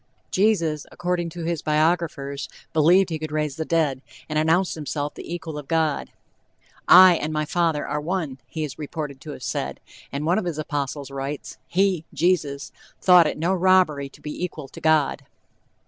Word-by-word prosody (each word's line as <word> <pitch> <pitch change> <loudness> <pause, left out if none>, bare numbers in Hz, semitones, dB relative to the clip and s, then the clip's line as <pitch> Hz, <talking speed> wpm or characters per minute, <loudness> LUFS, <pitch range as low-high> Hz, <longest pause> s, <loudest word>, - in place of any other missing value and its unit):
Jesus, 170 -7 +1
according 175 -1 -2
to 170 +1 -7
his 165 -1 -2
biographers, 155 -3 0 0.2
believed 175 +4 +4
he 160 - -2
could 155 -1 -5
raise 150 -2 -1
the 160 - -2
dead, 155 -6 +1 0.3
and 155 0 0
announced 165 +4 +2
himself 145 -1 -4
the - - -9
equal 160 -3 -5
of 145 - -10
God. 160 -3 0 0.8
"I 185 0 +9
and 155 +1 -3
my 155 0 -1
father 165 -2 0
are 150 - -2
one," 155 -5 -3
he 160 +3 -4
is 150 -1 -6
reported 145 -2 -5
to 150 - -8
have 130 - -10
said; - - -3 0.3
and 140 +3 -3
one 175 +5 +3
of 220 - -4
his 170 -4 -3
apostles 145 -2 -3
writes: 140 +1 -5
"He 185 -3 +1
(Jesus) 150 -5 0 0.3
thought 180 -3 +6
it - - -3
no 170 +4 +1
robbery 180 -7 +3
to - - -19
be 150 +3 -5
equal 155 -5 -5
to - - -12
God." 155 -3 +2
155 Hz, 180 wpm, -24 LUFS, 150-175 Hz, 0.8 s, I